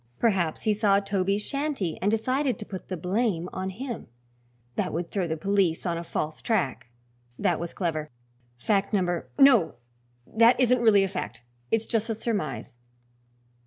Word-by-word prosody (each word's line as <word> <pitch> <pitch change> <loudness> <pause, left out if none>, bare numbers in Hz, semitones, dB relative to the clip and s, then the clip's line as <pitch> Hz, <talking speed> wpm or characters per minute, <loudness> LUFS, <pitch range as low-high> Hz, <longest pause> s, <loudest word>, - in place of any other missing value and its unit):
Perhaps 185 -9 +1
he 215 - +3
saw 205 -1 +3
Toby's 200 0 0
shanty 275 - -2
and 200 - +2
decided 255 +3 0
to 210 - -7
put 190 -3 -8
the 185 - -4
blame 180 0 0
on 185 0 -3
him; 235 +5 -6 0.7
that - - -1
would 170 +1 -3
throw 190 -4 -1
the 160 0 -2
police 190 -1 +1
on 170 -2 0
a 170 - -4
false 155 -2 -3
track. 185 - -1 0.5
That 180 -5 +1
was 170 0 -4
clever. 155 -4 -2 0.5
Fact 200 - 0
number 175 -4 0
No! 270 - +6 0.5
that 230 - +4
isn't 250 -1 +4
really 210 -4 +6
a - - +1
fact; 115 - -6 0.3
it's 225 0 +1
just 225 -1 -1
a 225 - 0
surmise. 190 - -3
200 Hz, 160 wpm, -27 LUFS, 170-225 Hz, 0.7 s, No